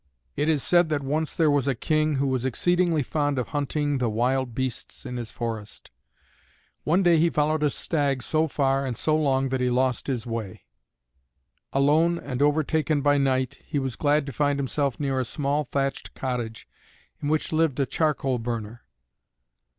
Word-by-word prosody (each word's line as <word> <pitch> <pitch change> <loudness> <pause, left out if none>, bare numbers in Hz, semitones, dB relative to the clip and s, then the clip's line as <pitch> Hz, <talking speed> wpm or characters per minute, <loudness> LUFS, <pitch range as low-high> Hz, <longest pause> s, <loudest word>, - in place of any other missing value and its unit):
It 150 +2 0
is 150 -4 +2
said 175 -2 +4
that 145 -2 -1
once 150 +3 -1
there 160 -3 +3
was 145 -2 +1
a 135 - +1
King 155 +4 +1
who 140 +1 0
was 130 -2 0
exceedingly 170 +4 +1
fond 145 0 -1
of 125 - -2
hunting 145 -1 -1
the 120 -2 +1
wild 125 +2 0
beasts 130 0 -4
in 125 -1 -5
his 120 -2 -5
forests. 115 -4 -6 0.9
One 175 +6 +2
day 170 -2 +5
he 170 +2 +4
followed 155 0 +1
a 150 - +3
stag 140 -3 -1
so 155 +1 +1
far 135 -2 +1
and 125 -4 -3
so 155 - +1
long 135 -3 +1
that 130 0 -1
he 125 - +2
lost 130 0 0
his 125 -5 -2
way. 115 -5 -5 1.1
Alone 155 +5 +3
and 130 -5 -4
overtaken 150 0 +2
by 145 -1 +4
night, 130 -2 0
he 150 - -4
was 135 -3 -1
glad 145 +1 +2
to 140 - -5
find 145 +2 +1
himself 140 -1 -1
near 135 -2 0
a - - +1
small 145 +4 -1
thatched 135 -1 -3
cottage 120 -4 -4 0.5
in 145 - -2
which 155 +1 0
lived 155 -4 +1
a 140 - +3
charcoal 135 -2 0
burner. 115 0 -5
140 Hz, 180 wpm, -25 LUFS, 130-150 Hz, 1.1 s, day